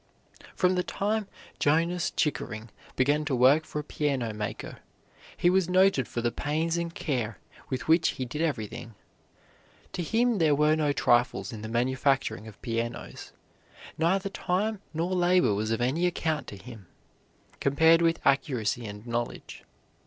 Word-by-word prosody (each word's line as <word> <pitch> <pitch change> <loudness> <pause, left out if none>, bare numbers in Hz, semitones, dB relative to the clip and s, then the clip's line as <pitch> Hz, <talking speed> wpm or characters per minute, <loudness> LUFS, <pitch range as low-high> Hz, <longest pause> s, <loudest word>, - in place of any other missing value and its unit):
From 180 0 +3
the 180 - +1
time 210 +3 -2 0.3
Jonas 170 +4 +2
Chickering 110 - -2 0.2
began 145 +4 +2
to 145 -3 0
work 135 +6 +5
for - - -7
a 150 - -2
piano 135 -7 -1
maker, 105 0 -5 0.6
he - - +2
was 180 0 +3
noted 185 - +3
for 120 - -3
the 120 0 0
pains 160 +5 -1
and 170 0 -2
care 120 - -3 0.3
with 130 - -3
which 160 +1 +4
he 130 - -2
did 150 +6 -5
everything. 115 -7 -3 1.0
To - - -3
him 230 +5 +1
there 155 -3 +4
were 150 +1 +3
no 150 -2 +1
trifles 120 -1 +1
in 110 - -7
the 110 - -6
manufacturing 130 -1 0
of 110 - -12
pianos. 115 -1 -4 0.6
Neither 190 +5 +1
time 200 +3 -1
nor 170 +3 -2
labor 180 - +3
was 105 +2 -1
of 115 +2 -1
any 150 +9 +1
account 160 -3 -2
to 100 - -8
him, 110 -2 -12 0.7
compared 160 +4 +4
with 165 0 +2
accuracy 125 -5 +1
and 105 +1 -9
knowledge. 120 0 -5
145 Hz, 150 wpm, -28 LUFS, 120-170 Hz, 1.0 s, work